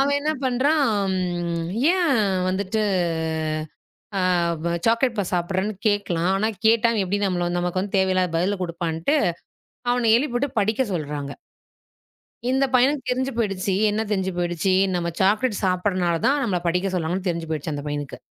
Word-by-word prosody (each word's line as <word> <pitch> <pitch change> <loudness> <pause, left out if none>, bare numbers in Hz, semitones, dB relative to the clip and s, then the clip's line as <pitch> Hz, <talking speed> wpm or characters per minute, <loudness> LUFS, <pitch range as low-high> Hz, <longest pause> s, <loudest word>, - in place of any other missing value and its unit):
அவன் 285 +1 +2
என்ன 305 +2 0
பண்றான்? 250 -6 +2 0.8
ஏன் 345 -7 +2 0.3
வந்துட்டு 195 +3 -1 1.4
ஆ - - +1 0.4
ப - - -1 0.2
சாக்லேட் 230 +1 +2
பார் 200 -3 -1
சாப்பிடுறேன்னு 185 +4 -1
கேட்கலாம். 185 -4 0
ஆனா, 215 +3 +1 0.2
கேட்டா 230 +1 +5
எப்டி 190 +2 -1
நம்மள 175 -2 0
நமக்கு 180 +1 -1
வந்து 195 +1 -2
தேவையில்லாத 185 -1 +2
பதில 195 +4 0
குடுப்பான்ட்டு, 170 - -1 0.8
அவனை 235 -2 +3
எழுப்பி 245 0 -1
விட்டுப் 260 -3 -1
படிக்கச் 220 +2 0
சொல்றாங்க. 145 -4 -4 1.2
இந்தப் 265 0 +1
பையனுக்கு 260 +1 +3
தெரிஞ்சு 260 +2 -1
போயிடுச்சு. 195 -4 -1 0.2
என்ன 210 - -1
தெரிஞ்சு 190 -2 0
போயிடுச்சு? 175 +1 0 0.2
நம்ம 170 -1 -1
சாக்லேட் 210 +3 +2
சாப்பிடுறனால 180 -2 +1
தான் 280 +1 +3
நம்மள 185 -6 0
படிக்கச் 185 +2 0
சொல்றாங்கன்னு 180 +3 -2
தெரிஞ்சு 165 -1 -4
போயிடுச்சு 155 0 -3
அந்தப் 145 +1 -5
பையனுக்கு. 145 -1 -5
195 Hz, 140 wpm, -23 LUFS, 175-235 Hz, 1.4 s, கேட்டா